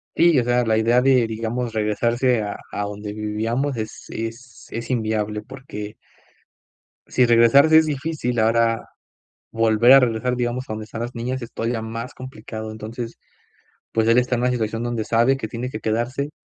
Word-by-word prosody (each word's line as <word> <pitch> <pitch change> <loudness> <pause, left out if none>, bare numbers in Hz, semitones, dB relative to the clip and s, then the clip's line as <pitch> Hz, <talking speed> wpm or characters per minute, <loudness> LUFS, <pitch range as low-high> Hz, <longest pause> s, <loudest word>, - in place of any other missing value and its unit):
Sí, 170 -3 +5
o 125 - +2
sea, 120 0 +2
la 110 -1 +2
idea 115 +3 +3
de, 130 -2 +4
digamos, 115 +2 -3
regresarse 115 +3 +1
a 100 0 -4
a 105 - -3
donde 105 0 -6
vivíamos 115 +6 -2
es 110 0 -6
es 115 +2 -7
es 115 +3 -6
inviable 110 -3 -1
porque 125 -6 -8 1.1
si 125 - +3
regresarse 130 +7 +6
es 160 - +4
difícil 145 -4 -2
ahora, 115 +1 +2 0.6
volver 115 +2 +4
a 135 - +9
regresar, 125 0 0
digamos, 125 +1 -2
a - - -4
donde 110 0 -6
están 115 - -8
las 120 +1 -5
niñas 125 +3 -3
es 115 - -8
todavía 115 0 -2
más 115 +2 -6
complicado. 110 -3 -8
Entonces, 115 +2 -7 0.8
pues, 110 0 +1
él 115 +2 +5
está 125 0 +2
en 120 - -2
una 125 - +2
situación 115 -2 -2
donde 120 -2 -2
sabe 120 +4 +3
que 110 -5 -5
tiene 120 +3 -4
que 110 - -6
quedarse, 120 +6 -1
115 Hz, 175 wpm, -22 LUFS, 110-125 Hz, 1.1 s, a